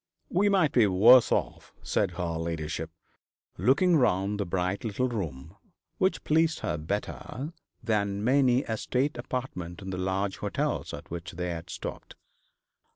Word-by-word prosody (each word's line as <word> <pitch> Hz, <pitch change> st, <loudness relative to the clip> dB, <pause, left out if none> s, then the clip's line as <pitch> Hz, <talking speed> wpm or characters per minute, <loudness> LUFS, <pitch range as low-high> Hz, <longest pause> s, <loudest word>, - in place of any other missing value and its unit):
'We 200 Hz, +3 st, +3 dB
might 185 Hz, -8 st, +3 dB
be 115 Hz, -4 st, +5 dB
worse 115 Hz, +7 st, +7 dB
off,' -, -, -2 dB
said 90 Hz, -, 0 dB
her 85 Hz, 0 st, -2 dB
ladyship, 80 Hz, -2 st, -3 dB, 0.7 s
looking 165 Hz, +7 st, +4 dB
round 100 Hz, -5 st, +1 dB
the 100 Hz, -, -1 dB
bright 90 Hz, +2 st, -1 dB
little 115 Hz, +3 st, 0 dB
room, 85 Hz, -, -5 dB, 0.4 s
which 190 Hz, -, +1 dB
pleased 160 Hz, +1 st, +2 dB
her -, -, -1 dB
better 105 Hz, -, -4 dB, 0.3 s
than 100 Hz, -3 st, 0 dB
many 130 Hz, +1 st, +3 dB
a 110 Hz, -, -3 dB
state 130 Hz, +6 st, 0 dB
apartment 110 Hz, -9 st, -5 dB
in 95 Hz, -1 st, -6 dB
the 90 Hz, -, -4 dB
large 95 Hz, +1 st, -1 dB
hotels -, -, -2 dB
at 75 Hz, -, -9 dB
which 85 Hz, 0 st, -6 dB
they 90 Hz, +1 st, -3 dB
had 85 Hz, +1 st, -6 dB
stopped. -, -, -7 dB
100 Hz, 150 wpm, -28 LUFS, 90-130 Hz, 0.7 s, worse